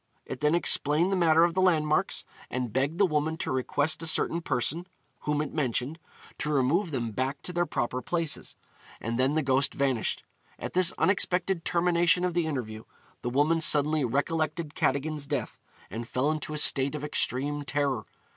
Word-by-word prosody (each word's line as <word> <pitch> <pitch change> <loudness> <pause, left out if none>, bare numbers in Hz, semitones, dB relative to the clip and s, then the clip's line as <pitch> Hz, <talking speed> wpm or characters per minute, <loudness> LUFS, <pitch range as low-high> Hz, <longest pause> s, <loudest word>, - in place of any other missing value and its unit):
It - - -6
then 150 +2 +2
explained 170 +1 +2
the - - +2
matter 165 -2 +4
of 170 0 +2
the 185 - +1
landmarks, 155 -4 +1 0.2
and 125 -3 -3
begged 140 +5 0
the 200 - +5
woman 155 -1 0
to - - -3
request 145 +5 0
a 165 - -2
certain 165 +1 +2
person 160 +5 -1 0.4
(whom 150 0 +1
it 150 - -7
mentioned) 140 +1 -1 0.4
to 150 - -2
remove 150 +7 +2
them 120 -6 -3
back 130 +5 -3
to 180 - -6
their 175 0 0
proper 125 +2 -2
places; 165 +4 -3 0.4
and 115 +2 -3
then 135 +3 +2
the 155 - +1
ghost 135 +1 +1
vanished. 130 -6 0 0.3
At - - -6
this 185 -1 +3
unexpected 185 -2 +1
termination 175 +1 +2
of 180 - -1
the 170 -2 0
interview, 110 -7 -4 0.4
the 120 - -2
woman 150 +6 +2
suddenly 150 0 +3
recollected 155 +4 -1
Cadogan's 145 +1 -1
death, - - -3 0.3
and 115 +3 -5
fell 130 +5 0
into 155 -1 -4
a - - -3
state 140 -1 +3
of 150 - -5
extreme 145 0 -1
terror. 140 -6 -1
150 Hz, 175 wpm, -28 LUFS, 130-165 Hz, 0.4 s, the